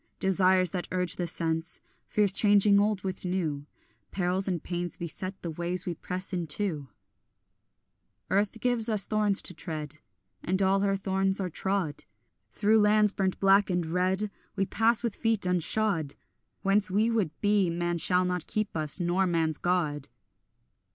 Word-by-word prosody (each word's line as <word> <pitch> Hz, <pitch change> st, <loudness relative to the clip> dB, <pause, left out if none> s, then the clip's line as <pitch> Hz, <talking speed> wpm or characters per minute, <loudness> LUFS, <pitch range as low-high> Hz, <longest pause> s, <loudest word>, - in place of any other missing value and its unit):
Desires 185 Hz, -2 st, +2 dB
that 180 Hz, -2 st, -4 dB
urge 180 Hz, -1 st, -1 dB
the 175 Hz, -, -2 dB
sense, 165 Hz, 0 st, -2 dB, 0.3 s
Fears 205 Hz, -3 st, +1 dB
changing 205 Hz, -1 st, +5 dB
old 205 Hz, -2 st, 0 dB
with 190 Hz, -1 st, -4 dB
new, 160 Hz, -6 st, -2 dB, 0.4 s
Perils 185 Hz, +1 st, -1 dB
and 180 Hz, -4 st, -2 dB
pains 175 Hz, -1 st, -4 dB
beset 185 Hz, +3 st, -5 dB
the 170 Hz, -, -3 dB
ways 175 Hz, +3 st, +2 dB
we 180 Hz, -, -2 dB
press 185 Hz, +3 st, -5 dB
into; 170 Hz, -3 st, -2 dB, 1.4 s
Earth 205 Hz, +3 st, 0 dB
gives 240 Hz, -1 st, 0 dB
us 210 Hz, -3 st, 0 dB
thorns 210 Hz, -2 st, 0 dB
to -, -, -5 dB
tread, 150 Hz, -3 st, -6 dB, 0.4 s
And 185 Hz, +2 st, -1 dB
all 195 Hz, 0 st, +3 dB
her 195 Hz, 0 st, +1 dB
thorns 190 Hz, 0 st, -1 dB
are 185 Hz, -2 st, -3 dB
trod; 190 Hz, -4 st, -2 dB, 0.4 s
Through 210 Hz, -, +2 dB
lands 210 Hz, 0 st, +4 dB
burnt 190 Hz, -1 st, -1 dB
black 195 Hz, +1 st, +4 dB
and 175 Hz, -2 st, 0 dB
red 190 Hz, +3 st, 0 dB, 0.2 s
We 195 Hz, -1 st, 0 dB
pass 225 Hz, +4 st, +1 dB
with 235 Hz, -4 st, -1 dB
feet 225 Hz, -3 st, 0 dB
unshod; 180 Hz, -3 st, +1 dB, 0.5 s
Whence 195 Hz, 0 st, +2 dB
we 215 Hz, +5 st, +1 dB
would 215 Hz, -7 st, +1 dB
be 205 Hz, -3 st, +2 dB
man 175 Hz, 0 st, -2 dB
shall 180 Hz, +3 st, +3 dB
not 180 Hz, -2 st, -3 dB
keep 215 Hz, -4 st, -2 dB
us, 155 Hz, +2 st, +3 dB
nor 180 Hz, +2 st, +1 dB
man's 160 Hz, -3 st, 0 dB
God. 155 Hz, -6 st, -1 dB
185 Hz, 155 wpm, -28 LUFS, 175-205 Hz, 1.4 s, changing